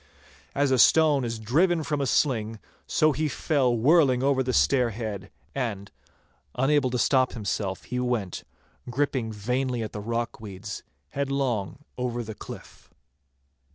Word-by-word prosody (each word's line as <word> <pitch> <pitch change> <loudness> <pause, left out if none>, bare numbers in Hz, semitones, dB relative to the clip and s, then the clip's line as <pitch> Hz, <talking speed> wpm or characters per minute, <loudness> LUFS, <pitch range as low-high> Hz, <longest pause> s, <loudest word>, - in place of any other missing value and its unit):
As 140 -1 +2
a 130 - +3
stone 150 -1 +5
is 115 -1 -3
driven 160 - +2
from 150 -1 -1
a 135 - 0
sling, 115 -6 +1 0.3
so 155 0 +3
he 155 +2 -1
fell 135 -3 +1
whirling 135 0 +4
over 135 -1 +3
the 130 0 -1
stair 125 -1 +3
head, 105 -4 -5 0.2
and, 105 -7 -3 0.6
unable 135 +1 +2
to 125 - -1
stop 130 +1 +3
himself, 100 -3 -3
he 125 - -3
went, 120 -7 -2 0.5
gripping 130 -3 -1
vainly 125 +3 -1
at 110 - -5
the 105 - -5
rock 115 +2 -3
weeds, 100 -1 -7 0.3
headlong 135 - -2
over 120 -1 -2
the 110 0 -7
cliff. - - -11
125 Hz, 145 wpm, -26 LUFS, 110-140 Hz, 0.6 s, stone